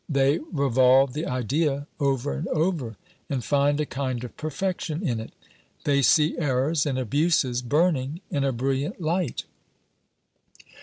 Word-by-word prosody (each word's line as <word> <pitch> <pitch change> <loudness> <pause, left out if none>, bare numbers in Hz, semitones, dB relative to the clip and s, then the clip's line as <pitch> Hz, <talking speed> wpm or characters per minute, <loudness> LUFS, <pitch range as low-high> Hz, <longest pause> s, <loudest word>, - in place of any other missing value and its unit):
They 140 +2 +2
revolve 130 -2 +4
the 155 +4 -3
idea 140 +4 0
over 140 -1 0
and 165 - -4
over, 155 - -1 0.3
and 135 -4 -2
find 145 0 +2
a 150 - +1
kind 130 -4 -3
of 125 - -8
perfection 175 +1 -3
in 120 -4 -1
it. 110 - -8 0.5
They 140 -1 +2
see 150 +4 +4
errors 145 +1 +1
and 135 -2 -1
abuses 130 0 +1
burning 150 +3 0
in 145 -5 0
a 135 - +1
brilliant 135 - -2
light. 170 -3 -1
140 Hz, 140 wpm, -25 LUFS, 130-155 Hz, 0.5 s, revolve